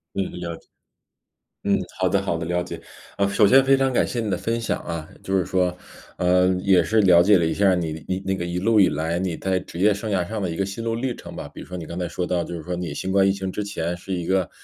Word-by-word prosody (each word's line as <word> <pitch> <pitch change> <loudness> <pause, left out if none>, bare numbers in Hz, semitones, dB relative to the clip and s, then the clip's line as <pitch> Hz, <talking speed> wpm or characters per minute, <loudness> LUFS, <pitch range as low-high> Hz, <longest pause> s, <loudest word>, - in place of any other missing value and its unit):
嗯 100 - 0
嗯， - - -8
了 85 -1 -4
解。 - - -22 1.0
嗯， - - +3 0.2
好 95 - +3
的 100 - +2
好 90 -4 -1
的， 80 - -4
了 90 0 0
解。 90 - -7 0.4
啊， 100 0 +2
首 100 +1 +4
先 135 +5 +6
非 135 0 +5
常 135 -1 +1
感 - - +3
谢 120 - -4
你 110 - -2
的 - - +1
分 115 +1 -2
享 115 - -2
啊， 80 -2 -5
就 95 0 -1
是 90 - +1
说， 90 -1 0 0.4
呃， 90 +1 +3
也 95 -2 +4
是 110 +8 +2
了 90 -3 +7
解 100 +1 +5
了 85 - +1
一 - - 0
下 100 -1 +4
你 80 -2 -4
你 95 0 0
那 95 - +1
个 85 - -3
一 90 0 -3
路 110 +2 +3
以 95 - +6
来 80 +3 -1
你 90 -3 -2
在 95 -1 -1
职 85 - -10
业 105 +2 +4
生 105 +2 -5
涯 90 -3 0
上 110 0 -4
的 90 - -1
一 80 - -5
个 100 - 0
心 100 +4 -6
路 115 0 -1
历 125 0 -2
程 - - -10
吧。 - - -6
比 - - -12
如 - - -9
说 90 - -7
你 80 -3 -6
刚 85 - -7
才 90 -1 -2
说 90 +1 -3
到 90 -1 0
就 85 - -6
是 80 - -7
说 90 - -3
你 85 -4 -4
新 95 +5 -3
冠 95 0 +4
疫 95 - +4
情 95 -1 -4
之 105 - -3
前 90 -4 -3
是 95 +2 -7
一 85 -2 -2
个 95 -2 +1
95 Hz, 320 characters per minute, -23 LUFS, 85-100 Hz, 1.0 s, 了